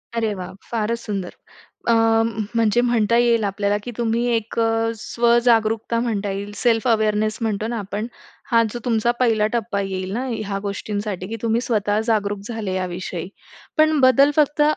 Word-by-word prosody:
अरे 225 -2 0
वाह! 185 -1 -7 0.2
फारच 230 0 -1
सुंदर. 200 -5 -4 0.6
अ, - - +5
म 225 -1 +2
म्हणजे 230 0 +3
म्हणता 235 -1 +2
येईल 235 -2 +3
आपल्याला 200 +1 0
की 245 - -5
तुम्ही 235 0 0
एक 225 0 -3
अ, 225 0 +1
स्वजागरूकता 235 -1 +2
म्हणता 210 -4 -1
येईल. 200 +1 -5
सेल्फ 230 +1 +1
अवेअरनेस 215 -1 +1
म्हणतो 215 -1 -1
ना 235 0 -2
आपण. 205 +2 -4 0.4
हा 230 -1 +5
जो 240 - -4
तुमचा 235 -1 +2
पहिला 225 -4 +3
टप्पा 225 -3 -1
येईल 190 -1 -3
ना, 245 +5 -2
ह्या 210 -4 -3
गोष्टींसाठी 205 -1 -4
की 225 - -4
तुम्ही 230 0 +1
स्वतः 210 -4 0
जागरूक 205 -3 0
झाले 220 -5 -3
याविषयी. 180 -1 -4 0.5
पण 310 0 +4
बदल 270 +2 +6
फक्त 295 0 +3
225 Hz, 165 wpm, -21 LUFS, 205-235 Hz, 0.6 s, बदल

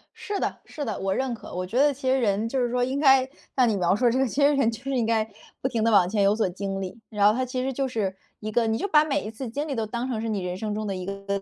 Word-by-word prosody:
是 410 -1 -4
的 - - -2
是 300 - -6
的， 215 - -3
我 195 0 0
认 260 +1 -1
可。 225 - -9
我 180 +1 -2
觉 205 +7 -4
得 285 +2 +5
其 260 -1 -3
实 265 - +3
人 215 -1 +1
就 265 - -1
是 240 - -1
说 245 0 +1
应 265 +3 -1
该 265 -3 +5 0.3
像 255 -2 +4
你 215 - +1
描 185 0 +2
述 240 +2 +3
这 245 - +1
个， 265 0 +2
其 270 +5 -2
实 285 +1 +5
人 275 -5 +3
就 225 - -8
是 275 - -3
应 250 -4 +1
该 220 -1 +1 0.3
不 - - +1
停 230 -4 -1
地 230 - +3
往 195 -4 +5
前 205 -1 +1
有 200 +2 +4
所 215 -5 +1
经 195 +1 -4
历， 190 +4 -6
然 205 -1 +3
后 210 - +5
它 255 +2 0
其 255 0 -3
实 270 - -1
就 270 +1 -1
是 205 -6 -2 0.2
一 215 0 -5
个 230 +1 +2
你 220 0 +1
就 400 - -2
把 305 -5 +5
每 310 -3 0
一 215 - -6
次 245 +3 -6
经 290 +6 -3
历 280 - -2
都 225 -2 -1
当 235 +3 -3
成 220 -3 -2
是 225 - -2
你 205 -3 -1
人 180 0 -3
生 210 +1 -3
中 215 0 -3
的 195 - -2
一 185 - -5
个 195 - -3
一 195 0 -12
个 200 0 -1
225 Hz, 370 characters per minute, -25 LUFS, 205-260 Hz, 0.3 s, 得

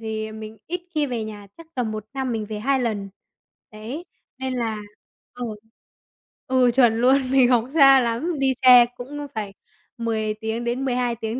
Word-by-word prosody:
thì, 220 -1 -4
ờ, 215 - -9
mình 220 0 -9
ít 355 +2 -3
khi 300 -2 +1
về 235 -4 -3
nhà, 210 -2 -9
chắc 330 - -13
tầm 235 -4 -2
1 215 -1 -5
năm 265 -2 -2
mình 220 -2 -3
về 215 0 -5
2 265 +5 +1
lần. 215 -5 -2 0.6
Đấy, 230 +11 -7 0.3
nên 260 0 -3
là 230 -3 -2 0.6
ờ, 245 - -6 1.0
ừ, 255 -1 +3
chuẩn 235 -3 +4
luôn, 260 +2 +5
mình 260 -2 +5
học 240 -3 +4
xa 275 -4 +7
lắm, 255 +7 -1
đi 265 -1 +2
xe 250 -1 +9
cũng 280 +4 -8
á 290 - -5
phải 205 -2 -4 0.4
10 220 -2 -1
tiếng 220 +2 -4
đến 240 +3 -2
12 245 -2 0
tiếng 225 +2 -4
240 Hz, 190 wpm, -23 LUFS, 220-265 Hz, 1.0 s, xe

